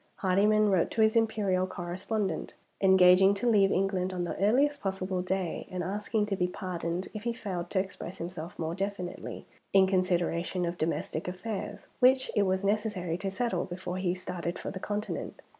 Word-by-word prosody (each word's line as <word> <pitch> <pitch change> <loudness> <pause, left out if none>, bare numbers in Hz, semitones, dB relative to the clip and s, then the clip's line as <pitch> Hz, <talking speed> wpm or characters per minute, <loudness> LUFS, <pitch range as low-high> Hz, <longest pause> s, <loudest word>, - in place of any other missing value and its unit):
Hardyman 210 +2 +3
wrote 185 -3 +3
to 220 - +2
his 220 +1 +3
Imperial 205 -5 +2
correspondent, 190 +3 -3 0.3
engaging 190 0 +6
to 205 +5 -2
leave 200 -4 +5
England 190 -1 +1
on 180 -1 -2
the 175 - -3
earliest 280 +7 +3
possible 190 -1 -2
day, 185 -2 -2
and 180 -1 -3
asking 210 +3 -1
to 205 -2 -1
be 180 -1 +1
pardoned 180 -1 -4
if 215 - -5
he 235 +2 -1
failed 180 -6 -4
to 190 - +1
express 190 -2 -5
himself 170 0 -6
more 160 0 -2
definitely, 195 -1 -4 0.3
in 195 -1 +7
consideration 180 -1 0
of 170 +1 -4
domestic 160 0 -2
affairs, 190 +3 -4 0.2
which 260 +1 +4
it 200 -2 +3
was 190 +1 0
necessary 200 -4 0
to 195 - -2
settle 235 +5 -1
before 180 0 -5
he 185 -1 0
started 180 -1 -4
for - - -5
the 185 - -6
Continent. 210 +2 -4
190 Hz, 175 wpm, -29 LUFS, 180-205 Hz, 0.3 s, in